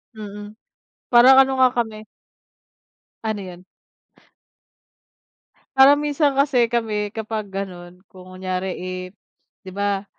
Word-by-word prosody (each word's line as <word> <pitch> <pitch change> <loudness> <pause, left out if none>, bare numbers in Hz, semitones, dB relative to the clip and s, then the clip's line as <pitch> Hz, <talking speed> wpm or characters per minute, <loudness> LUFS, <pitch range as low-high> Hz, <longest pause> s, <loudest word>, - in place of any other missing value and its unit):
Mm, 210 0 -9 0.6
parang 250 +2 +7
ano 265 0 -3
nga 255 -1 +6
kami. 220 -2 -3 1.2
Ano 220 -1 -2
'yon. 180 -1 -11 2.1
Parang 275 +2 +7
minsan 290 -1 0
kasi 260 -5 +2
kami 215 -3 -2
kapag 220 -1 -5
gano'n 180 -2 -7
kung 185 0 -15
kunyari, 185 0 -4
eh, 185 0 -6 0.6
'di 185 - -9
ba, 200 0 -2
210 Hz, 105 wpm, -21 LUFS, 185-240 Hz, 2.1 s, parang